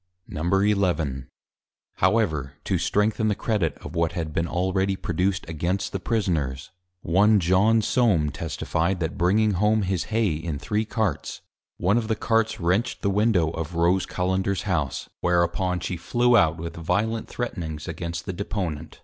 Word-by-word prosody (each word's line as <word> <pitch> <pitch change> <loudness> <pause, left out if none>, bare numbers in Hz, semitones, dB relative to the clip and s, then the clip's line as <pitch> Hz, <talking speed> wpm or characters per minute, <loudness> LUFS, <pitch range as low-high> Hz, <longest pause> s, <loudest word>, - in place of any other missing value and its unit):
XI. 85 -6 +1 0.7
However, 80 - +1
to - - 0
strengthen 110 +1 +1
the 105 - +1
Credit 100 -7 -1
of 75 - -7
what 85 -1 0
had 80 -3 -4
been 85 +2 0
already 95 +2 0
produced 95 0 -1
against 85 +5 -2
the 95 - -3
Prisoners, 85 - -1 0.3
One 100 +5 +4
John 100 +6 +3
Soam 100 - +2
Testifi'd, 85 +7 -2
That 80 -1 -2
bringing 105 +5 +3
home 105 +3 +2
his 95 -2 -1
Hay 110 -4 +1
in 80 0 -4
Three 105 +9 -1
Carts, 110 -7 -2 0.4
one 100 +6 +2
of 110 - -4
the 110 - +1
Carts 115 +1 0
wrenched 90 +7 0
the 100 - +2
Window 100 -6 +2
of 80 +1 -5
Rose 85 +3 +2
Cullenders 95 +1 -1
House, 80 -10 -1
whereupon 90 +1 +1
she 90 +1 -4
flew 120 +8 +2
out, 80 -7 +4
with 85 0 -6
violent 105 +7 -1
Threatenings 85 -11 -5
against 85 0 -5
the 95 - -3
Deponent. 85 -6 -4
90 Hz, 150 wpm, -25 LUFS, 85-105 Hz, 0.7 s, One